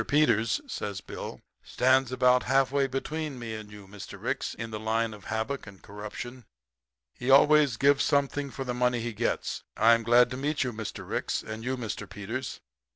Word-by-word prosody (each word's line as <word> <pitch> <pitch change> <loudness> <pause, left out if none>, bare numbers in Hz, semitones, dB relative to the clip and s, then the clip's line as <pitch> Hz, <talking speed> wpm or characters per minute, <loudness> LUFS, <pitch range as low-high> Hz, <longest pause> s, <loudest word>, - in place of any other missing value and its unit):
Peters,' 145 - +3
says 105 - -4
Bill, - - -8 0.2
'stands 130 0 +2
about 125 0 +4
halfway 135 +1 +2
between 145 +2 -3
me 115 -2 -5
and 110 -1 -8
you, 105 -2 -12
Mr. 100 0 -10
Ricks, - - -2
in 115 0 -6
the 110 - -4
line 110 +1 0
of 105 -3 -13
havoc 110 +4 -3
and 100 -1 -12
corruption. 105 +5 -8 0.7
He 125 - -5
always 145 -2 +6
gives 140 0 +4
something 140 0 +1
for 135 - -5
the 125 -1 -3
money 125 -1 +1
he 120 0 -3
gets. 115 +3 -1 0.2
I'm 115 +1 +5
glad 120 +2 +5
to 130 - -4
meet 145 +3 0
you, 125 -2 -3
Mr. 110 -2 -6
Ricks - - -2
you - - -12
and 110 +1 -6
Mr. 125 -3 -4
Peters. 110 +5 -5
125 Hz, 180 wpm, -28 LUFS, 110-135 Hz, 0.7 s, always